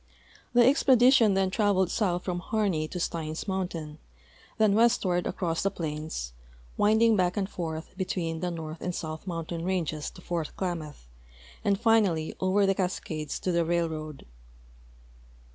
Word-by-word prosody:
The 240 0 +6
expedi 260 -1 +5
tion 220 -7 +5
then 190 -1 +1
traveled 190 -4 +2
south 180 -5 0
from 180 -2 -2
Harney 185 -6 0
to 180 - -6
Steins 160 +1 -3
mountain, 170 -5 -3 0.6
then 215 -2 +4
westward 210 -6 +2
across 165 -3 -2
the 195 - +2
plains, 155 - -5 0.4
winding 220 +2 +4
back 180 -1 +1
and 195 -2 0
forth 160 -4 -5
between 175 -4 -2
the 180 +1 -1
north 160 -1 -6
and 180 -1 -3
south 155 +3 -6
mountain 165 -1 -4
ranges 170 -5 -2
to 180 - -14
Fort 170 -3 -3
Klamath, 160 - -4 0.6
and 200 -1 +2
finally 210 -9 +2
over 190 +2 +3
the 195 - +3
Cascades 160 -5 -3
to 185 - 0
the 170 -1 +2
railroad. 160 -3 -2
180 Hz, 145 wpm, -28 LUFS, 160-200 Hz, 0.6 s, The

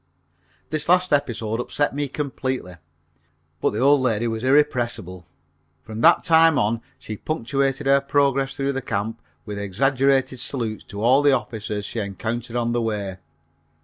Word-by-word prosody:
This 155 +1 -2
last 180 -1 +4
episode 115 -6 0
upset 145 +4 -1
me 145 0 -2
completely, 130 - -4 0.8
but - - +3
the 105 - -5
old 140 +1 +5
lady 120 -2 +1
was 115 0 -3
irrepressible. 120 - +1 0.6
From 110 0 -7
that 170 +7 +6
time 165 -2 +5
on 115 +1 +1 0.2
she 110 - -7
punctuated 135 0 -1
her 140 0 +4
progress 140 -1 +1
through 140 0 -1
the 135 - -3
camp 110 0 -3 0.2
with 105 -2 -5
exaggerated 130 +5 +1
salutes 115 -4 -3
to 100 +1 -6
all 130 +4 +5
the 145 -1 +4
officers 110 -4 -3
she 115 - -4
encountered 110 +4 -4
on 120 -1 0
the 120 0 0
way. 105 -4 -3
125 Hz, 150 wpm, -23 LUFS, 110-140 Hz, 0.8 s, that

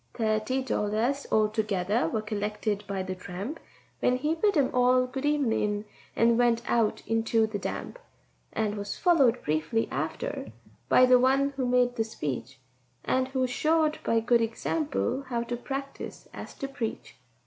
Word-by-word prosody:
Thirty 220 +3 0
dollars 235 +4 -1
altogether 210 -4 +1
were 215 +5 -2
collected 210 0 -2
by 195 -1 -2
the 185 0 -4
tramp, 185 - -6 0.4
When 250 - +2
he 300 +5 0
bid 395 +2 +2
'em 275 -3 +3
all 250 0 +4
good 265 +3 -3
evenin' 220 -8 +1 0.3
and 230 0 +4
went 235 -1 +3
out 225 -3 +1
into 225 0 +2
the 215 -2 -4
damp, - - -5 0.5
And 215 -1 -1
was 205 0 -4
followed 280 -10 +3
briefly 155 +9 0
after - - -3 0.4
by 255 - +7
the 250 0 +6
one 270 +2 +3
who 265 -2 -2
made 245 0 +2
the 225 - +2
speech, 135 - -5 0.5
And 255 0 +1
who 260 -1 0
showed 310 +4 +1
by 230 0 +2
good 235 +1 +3
example 275 +3 -1
how 235 -2 -1
to 240 +1 -3
practise 275 +3 -6
as - - -8
to 275 - -4
preach. 260 -5 -5
235 Hz, 155 wpm, -28 LUFS, 215-265 Hz, 0.5 s, by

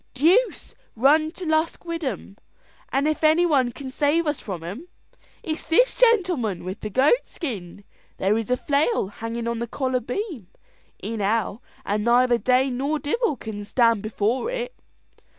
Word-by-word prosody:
Deuce 360 - +2 0.2
run 295 +7 +4
to 360 +2 -8
Lusk 315 +2 0
wid 335 -1 -4
'em! 210 - -4 0.6
and 275 +2 +1
if 310 +1 -1
any 315 +3 +5
one 270 -7 +2
can 265 +2 -8
save 300 +4 +1
us 295 -2 -1
from 180 -5 -6
'em, 205 - -7 0.6
it 315 -1 -2
is - - -11
this - - +4
gentleman 360 - +2
with 185 +4 -6
the 215 - -5
goat 275 - +3
skin. 200 - -6 0.3
There 195 +3 +2
is 225 0 -2
a 250 - +2
flail 285 - +1
hangin' 230 +2 -5
on 235 -1 -2
the 235 - -3
collar 260 +1 -1
beam, 250 - -5 0.6
in 220 +2 -4
hell, 215 +2 0 0.2
and 210 +1 -1
neither 240 +1 +4
Dane 255 +1 +2
nor 285 +4 0
devil 315 - 0
can 215 -4 -7
stand 230 0 +2
before 215 - -1
it." - - -4
260 Hz, 170 wpm, -24 LUFS, 225-315 Hz, 0.6 s, any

